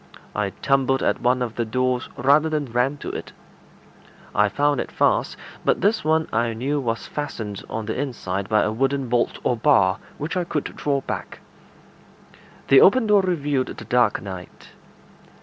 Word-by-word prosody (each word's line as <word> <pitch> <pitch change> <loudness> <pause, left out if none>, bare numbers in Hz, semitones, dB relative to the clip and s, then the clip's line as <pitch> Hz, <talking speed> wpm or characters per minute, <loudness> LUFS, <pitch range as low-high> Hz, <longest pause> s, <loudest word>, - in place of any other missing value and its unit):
I 105 -1 0
tumbled 135 +3 +1
at - - 0
one 125 +1 +2
of 115 -3 -4
the 120 - -1
doors 125 +2 -1
rather 145 +5 +4
than 155 -2 -1
ran 125 +4 +1
to - - -6
it. - - -7 1.0
I 105 0 +3
found 145 +2 +1
it - - -7
fast, - - +1 0.3
but - - +1
this 215 +3 +2
one 160 +1 +2
I 115 +1 +1
knew 135 +6 -1
was 115 -4 -2
fastened 110 -9 -5
on 110 -1 -4
the 110 - -2
inside 100 -8 -3
by 105 0 +3
a 105 - 0
wooden 135 +2 -1
bolt 120 0 +1
or 125 - +1
bar, 110 -6 +3 0.2
which 155 +5 -4
I 180 - +1
could 155 -4 -4
draw 140 -2 -1
back. - - -6 1.3
The 135 - +8
open 240 +4 +6
door 210 -2 +5
revealed 145 -8 0
the - - -8
dark 125 0 +2
night. 95 -3 -9
130 Hz, 170 wpm, -23 LUFS, 115-145 Hz, 1.3 s, The